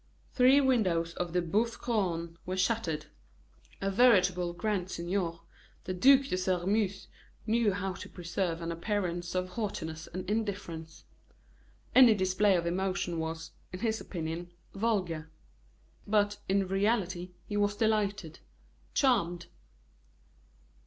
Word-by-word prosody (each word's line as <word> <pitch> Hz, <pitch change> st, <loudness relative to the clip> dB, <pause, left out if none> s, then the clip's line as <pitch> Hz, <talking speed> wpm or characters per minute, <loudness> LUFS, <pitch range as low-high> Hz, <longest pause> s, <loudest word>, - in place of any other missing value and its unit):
Three 260 Hz, +2 st, +6 dB
windows 185 Hz, -11 st, +1 dB
in 175 Hz, -1 st, -2 dB
the 180 Hz, 0 st, +1 dB
Boeuf 220 Hz, +7 st, 0 dB
Couronne 170 Hz, -8 st, -1 dB
were 185 Hz, +1 st, -4 dB
shattered. 180 Hz, -6 st, 0 dB, 0.8 s
A 195 Hz, 0 st, 0 dB
veritable 185 Hz, -6 st, +4 dB
grand 185 Hz, +1 st, -2 dB
seigneur, 170 Hz, -1 st, -2 dB, 0.4 s
the 185 Hz, -, -3 dB
Duc 265 Hz, +9 st, +6 dB
de 265 Hz, -9 st, -2 dB
Sairmeuse 190 Hz, +2 st, 0 dB, 0.4 s
knew 225 Hz, -1 st, +2 dB
how 195 Hz, 0 st, -2 dB
to -, -, -9 dB
preserve 170 Hz, -1 st, -3 dB
an 165 Hz, -, -2 dB
appearance 175 Hz, -1 st, -2 dB
of 185 Hz, 0 st, -1 dB
haughtiness 160 Hz, -7 st, -4 dB
and 185 Hz, +1 st, -6 dB
indifference. 195 Hz, -7 st, -4 dB, 0.9 s
Any 250 Hz, -4 st, +8 dB
display 190 Hz, +1 st, +3 dB
of 170 Hz, -1 st, 0 dB
emotion 180 Hz, -1 st, -1 dB
was, 160 Hz, 0 st, -4 dB, 0.2 s
in 185 Hz, -, -7 dB
his 220 Hz, -1 st, 0 dB
opinion, 170 Hz, 0 st, -5 dB, 0.2 s
vulgar; 185 Hz, -7 st, -1 dB, 0.8 s
but, 205 Hz, -1 st, +2 dB
in 195 Hz, 0 st, +2 dB
reality, 190 Hz, -3 st, 0 dB
he 205 Hz, -, -5 dB
was 205 Hz, 0 st, +1 dB
delighted, 205 Hz, -6 st, 0 dB, 0.6 s
charmed. 175 Hz, -, +2 dB
185 Hz, 120 wpm, -30 LUFS, 170-210 Hz, 0.9 s, Any